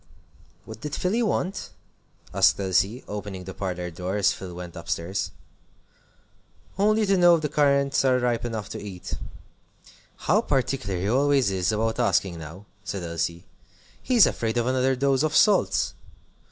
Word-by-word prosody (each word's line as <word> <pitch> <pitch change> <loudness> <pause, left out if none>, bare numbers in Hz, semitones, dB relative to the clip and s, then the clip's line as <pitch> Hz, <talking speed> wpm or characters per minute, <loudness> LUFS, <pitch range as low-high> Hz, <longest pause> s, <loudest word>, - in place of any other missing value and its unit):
"What 110 0 -10
did 150 0 -4
Philly 205 +6 0
want?" 195 -3 -1 0.6
asked 95 +1 +4
Elsie, 100 +5 +1
opening 100 -2 -6
the 95 +1 -8
parlor 90 -2 -4
door 90 +4 -3
as 100 - +3
Phil 90 -2 -8
went 90 -1 -8
up 85 -1 -9
stairs. 90 +2 -2 1.5
"Only 215 +2 +3
to 195 -1 +2
know 175 -1 +6
if 160 - -3
the 150 - 0
currants 140 -2 +2
are 130 -1 +3
ripe 120 -2 0
enough 110 -4 -4
to - - -6
eat." 95 -4 -8 1.0
"How - - +2
particular 130 -8 -1
he 95 - -2
always 135 -1 +3
is 95 -1 0
about 110 +2 -1
asking 95 -6 +1
now!" 80 +6 -10 0.2
said 95 -2 -4
Elsie; 85 0 -3 0.6
"he's 245 -6 +5
afraid 115 0 -1
of 120 - +1
another 130 +1 +2
dose 135 0 +2
of 155 0 0
salts." 210 -2 +3
110 Hz, 155 wpm, -25 LUFS, 95-140 Hz, 1.5 s, know